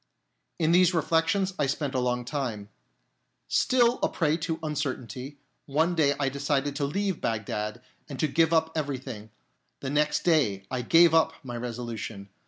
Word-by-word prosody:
In 160 -1 +2
these 180 +1 +5
reflections 165 +5 +1
I 140 - +2
spent 140 0 -2
a 130 - +1
long 125 -1 -1
time. 120 -7 -4 0.8
Still 245 -1 +3
a - - +2
prey 155 -3 +1
to 165 0 -3
uncertainty, 140 -3 -4 0.3
one 160 +5 +1
day 145 -4 +2
I 140 - +1
decided 140 +1 -1
to 140 - 0
leave 190 +4 -2
Bagdad 105 +1 -3 0.3
and 135 -3 -7
to 155 - +2
give 160 +3 +2
up 160 -1 +2
everything; 130 -7 -4 0.5
the 135 - -4
next 150 +1 +1
day 120 - +2
I 130 -1 -1
gave 165 +6 +5
up 165 0 +4
my 125 -2 -6
resolu 120 -1 -5
tion. 100 -2 -7
145 Hz, 165 wpm, -27 LUFS, 125-160 Hz, 0.8 s, these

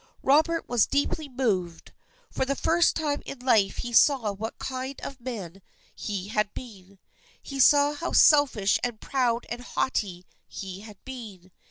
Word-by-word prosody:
Robert 315 +4 +3
was 240 -3 +2
deeply 285 +1 -1
moved. 195 -10 -2 0.4
For - - -1
the 275 +1 -1
first 335 +3 +2
time 295 -3 -1
in 275 - -7
his 250 - -15
life 210 -6 +3
he 240 -1 -5
saw 245 -4 +4
what 215 +3 -6
kind 260 +1 -5
of 265 -2 -8
man 200 -7 -7 0.3
he 200 -2 -5
had 210 -1 0
been. 200 -5 -11 0.4
He 275 -1 -8
saw 285 +2 +5
how 315 +4 -4
selfish 270 -10 +4
and 240 -3 -2
proud 245 -3 0
and 240 +1 -6
haughty 195 -8 -2 0.2
he 190 -1 -7
had 210 -1 -12
been. 215 -9 -9
245 Hz, 160 wpm, -26 LUFS, 205-275 Hz, 0.4 s, saw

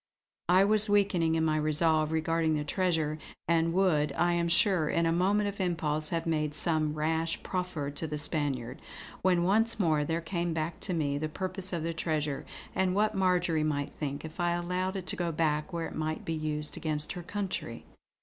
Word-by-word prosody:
I 185 +2 +6
was 210 +1 +3
weakening 185 -5 +3
in 160 0 +1
my 155 -1 +2
resolve 155 0 +2
regarding 160 0 +1
the 150 - -1
treasure, 160 -2 0 0.3
and 165 0 +2
would, 170 -6 +2
I 175 0 +2
am 170 0 +1
sure, 170 -3 +3
in 170 - +1
a 165 - +2
moment 200 +5 +2
of 200 0 -6
impulse 155 -4 0
have 165 -2 -2
made 155 -2 0
some 155 -2 +1
rash 160 +2 -1
proffer 180 -6 -3
to 160 +3 -4
the 150 0 -3
Spaniard; 140 -5 -1 0.4
when 180 -2 +3
once 220 +5 +2
more 155 -6 +2
there 165 +3 -1
came 170 0 -2
back 160 +1 -3
to 185 - -2
me 145 -3 0
the 155 +1 -2
purpose 185 +2 -3
of 170 -3 -2
the 165 0 -2
treasure, 155 -3 -2 0.3
and 185 -1 +1
what 210 +1 +2
Marjory 180 -4 +2
might 145 -2 -1
think 140 0 -5
if 160 +3 -10
I 175 0 +2
allowed 180 +2 -2
it 190 -2 -4
to - - 0
go 175 -2 -1
back 150 -1 0
where 170 -1 -2
it - - -7
might 155 0 -3
be 165 - -2
used 150 -1 -3
against 155 -1 -2
her 175 - -5
country. 185 - -4
165 Hz, 200 wpm, -30 LUFS, 155-180 Hz, 0.4 s, I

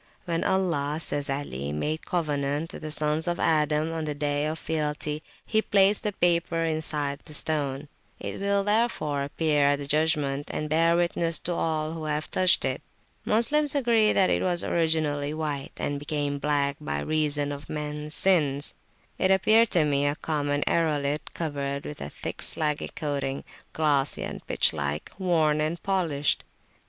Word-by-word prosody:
When 165 -2 -1
Allah, 165 -6 0
says 145 -3 0
Ali, 75 - -3
made 150 - -3
covenant 150 -2 -1
with - - -8
the 155 - -5
Sons 150 +1 +1
of 175 0 -1
Adam 155 0 +2
on 160 -1 -3
the 150 -1 -3
Day 145 0 0
of 155 +1 -3
Fealty, 150 -1 -2 0.2
he 220 -1 +2
placed 200 -1 +3
the 210 - -1
paper 170 -2 +1
inside 150 -3 -1
the 150 - -9
stone; 145 -2 -1 0.3
it - - -5
will, 200 0 +1
therefore, 205 -10 +1
appear 145 0 +1
at 145 0 +4
the 140 - -5
judgment, 145 -1 0
and 150 - -3
bear 165 +2 +4
witness 170 -1 +1
to 175 - -2
all 155 -2 -1
who 160 -1 -5
have 150 0 -2
touched 185 -1 +3
it. - - -1 0.4
Moslems 290 +7 +3
agree 235 -5 +3
that 190 - +3
it - - +1
was 175 -2 +1
originally 155 -3 0
white, 150 -3 -3
and 145 0 -2
became 145 -1 -2
black 140 -1 0
by 75 0 -2
reason 145 - 0
of 145 0 -8
mens 150 0 -3
sins. 150 -7 +3 0.5
It 185 - +2
appeared 215 +4 +5
to 165 -4 +3
me 145 -1 +2
a 145 - 0
common 145 -2 -1
aerolite 150 -3 0
covered 140 -3 -3
with 150 - -7
a 70 - -5
thick - - -6
slaggy 150 -2 -1
coating, 140 -2 -2 0.3
glossy 145 -3 +1
and - - -6
pitch - - +3
like, 75 0 -3
worn 160 -5 +2
and 155 +3 -1
polished. 165 -8 +1
155 Hz, 165 wpm, -26 LUFS, 145-170 Hz, 0.5 s, appeared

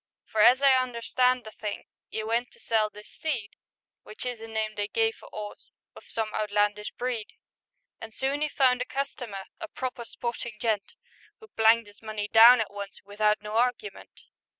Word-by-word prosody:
For, 215 - 0
as 255 +5 +6
I 275 - +7
understand 250 +1 +1
the 220 - -9
thing, 210 -1 -5 0.3
'E 220 - -3
went 230 +2 0
to - - -20
sell 220 -2 +1
this 210 0 -13
steed 240 -10 -4 0.3
— - - -66
Which 215 - -9
is 245 -3 -4
a 225 - -7
name 220 -1 -2
they 205 -1 -2
give 450 - 0
a - - -12
'orse 210 -1 -8 0.3
Of - - -13
some 220 -1 -2
outlandish 210 0 0
breed 240 -3 -3 0.3
—, - - -51
And 225 - -7
soon 270 +5 -1
'e 305 - +1
found 255 -3 +3
a - - 0
customer, 250 -7 -4 0.2
A 330 - -5
proper 255 -5 -5
sportin' 235 0 -5
gent, 220 -4 -1 0.4
Who 440 - -15
planked 225 - +4
'is 205 0 -17
money 215 -1 -4
down 230 +3 +9
at 205 -2 -4
once 200 -1 -8
Without 210 +1 +1
no 210 0 -6
argument. 250 - -2
225 Hz, 190 wpm, -27 LUFS, 210-250 Hz, 0.4 s, down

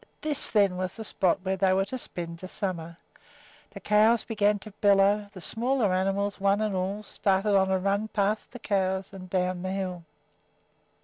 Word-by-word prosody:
This, 300 -2 -2
then, 200 -4 +3
was 185 0 -3
the 225 - -6
spot 185 -3 +1
where 190 0 0
they 190 0 +2
were 195 +1 +2
to 255 +6 -5
spend 170 -6 -6
the 185 - -7
summer! 170 -4 -4 0.7
The - - -10
cows 215 +2 +3
began 210 -2 +1
to 215 +1 -10
bellow. 200 0 +3
The 185 - -11
smaller 235 -1 +1
animals, 195 +2 0
one 200 +1 +3
and 215 -2 -1
all, 195 +3 -2
started 200 0 +1
on 190 -1 +3
a 190 - +2
run 200 +3 0
past 210 0 -1
the 245 - -8
cows 190 -3 -1
and 185 -1 -9
down 180 -1 -1
the 185 - -3
hill. 185 -2 -3
195 Hz, 185 wpm, -27 LUFS, 185-210 Hz, 0.7 s, then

